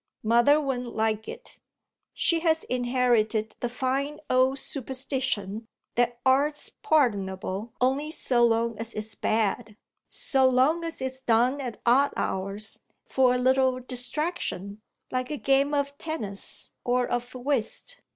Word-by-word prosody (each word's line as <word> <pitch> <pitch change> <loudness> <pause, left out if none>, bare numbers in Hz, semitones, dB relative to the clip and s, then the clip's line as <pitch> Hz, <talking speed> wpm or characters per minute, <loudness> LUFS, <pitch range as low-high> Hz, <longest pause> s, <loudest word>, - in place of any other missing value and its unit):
"Mother 235 +7 +5
wouldn't 250 -4 -3
like 220 -1 0
it. 475 - -10 0.5
She 335 -2 +1
has 320 -1 +2
inherited 240 -3 +1
the 240 - -2
fine 270 +4 -2
old 260 +1 +3
superstition 255 -6 -3 0.3
that 240 0 +1
art's 285 +3 +2
pardonable 205 - 0
only 270 +4 +1
so 250 -6 +1
long 230 -1 +2
as 230 0 -5
it's 215 +1 -4
bad 215 -1 -1 0.3
so 265 -2 +2
long 270 +7 +3
as 330 -4 -4
it's 260 0 -3
done 250 +3 +2
at 245 -5 -6
odd 270 +4 +4
hours, 200 +3 -3 0.3
for 255 -1 +3
a - - +2
little 260 0 +2
distraction, 245 - -3 0.3
like 255 0 -2
a 300 - -3
game 275 +3 +2
of 280 0 -1
tennis 215 -12 0
or 245 0 +1
of 245 +1 -3
whist. 265 - -2
250 Hz, 130 wpm, -27 LUFS, 225-275 Hz, 0.5 s, Mother